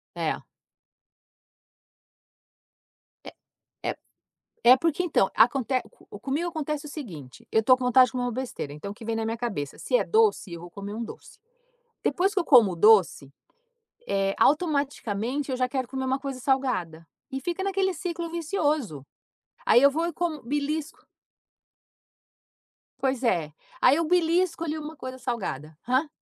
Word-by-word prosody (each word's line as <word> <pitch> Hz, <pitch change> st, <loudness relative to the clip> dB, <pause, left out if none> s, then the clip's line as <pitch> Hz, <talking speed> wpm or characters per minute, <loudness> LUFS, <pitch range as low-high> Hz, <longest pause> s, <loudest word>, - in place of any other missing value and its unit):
É. -, -, -1 dB, 2.9 s
É -, -, -9 dB, 0.5 s
é -, -, -1 dB, 0.7 s
é, 250 Hz, +2 st, +8 dB
porque, 330 Hz, +3 st, 0 dB
então, 300 Hz, -, +2 dB
aconte 255 Hz, +2 st, +3 dB
co 205 Hz, -, -14 dB
comigo 300 Hz, +8 st, -2 dB
acontece 305 Hz, -2 st, -4 dB
o -, -, -7 dB
seguinte, 165 Hz, -, -9 dB
eu 220 Hz, -, +3 dB
tô 255 Hz, +1 st, +6 dB
com 255 Hz, -, -3 dB
vontade 255 Hz, 0 st, +6 dB
de -, -, -10 dB
comer 250 Hz, -1 st, -2 dB
uma 245 Hz, -, -1 dB
besteira, 240 Hz, -, -5 dB
então, 180 Hz, +7 st, -7 dB
o -, -, -7 dB
que 225 Hz, 0 st, -12 dB
vem 225 Hz, -1 st, -1 dB
na 225 Hz, -, -1 dB
minha 225 Hz, +1 st, -2 dB
cabeça? 200 Hz, -, -4 dB
Se -, -, -1 dB
é -, -, +4 dB
doce 435 Hz, -, +2 dB
eu 170 Hz, -, -7 dB
vou 175 Hz, -, -10 dB
comer 200 Hz, +2 st, -7 dB
um 230 Hz, +2 st, -4 dB
doce. 235 Hz, -, -11 dB, 0.6 s
Depois 385 Hz, +3 st, +1 dB
que 380 Hz, -, +2 dB
eu -, -, -2 dB
como 230 Hz, -9 st, +6 dB
o -, -, -6 dB
doce, 190 Hz, -9 st, +4 dB, 0.8 s
eh, 195 Hz, 0 st, 0 dB
automaticamente 280 Hz, -, 0 dB
eu 255 Hz, -, -1 dB
já 255 Hz, 0 st, +1 dB
quero 260 Hz, -1 st, -3 dB
comer 265 Hz, 0 st, -4 dB
uma 265 Hz, +1 st, 0 dB
coisa 270 Hz, -2 st, -5 dB
salgada, 240 Hz, -, -1 dB, 0.2 s
e 270 Hz, 0 st, -4 dB
fica 350 Hz, +5 st, -3 dB
naquele 385 Hz, -1 st, 0 dB
ciclo 340 Hz, -1 st, -4 dB
vicioso. 305 Hz, -, -1 dB, 0.6 s
Aí 240 Hz, -, +6 dB
eu 280 Hz, -, +7 dB
vou 325 Hz, +4 st, -1 dB
e 345 Hz, -, -3 dB
como 325 Hz, -3 st, -3 dB
belisco 295 Hz, +5 st, -3 dB, 2.0 s
Pois 265 Hz, -1 st, -1 dB
é, 170 Hz, -10 st, 0 dB, 0.3 s
aí 255 Hz, -, +6 dB
eu 335 Hz, -, +1 dB
belisco 340 Hz, 0 st, +2 dB
ali 315 Hz, -1 st, -2 dB
uma 310 Hz, 0 st, -7 dB
coisa 260 Hz, -1 st, -7 dB
salgada. 160 Hz, -, -4 dB
Hã? 260 Hz, +5 st, +1 dB
260 Hz, 165 wpm, -26 LUFS, 220-315 Hz, 2.9 s, é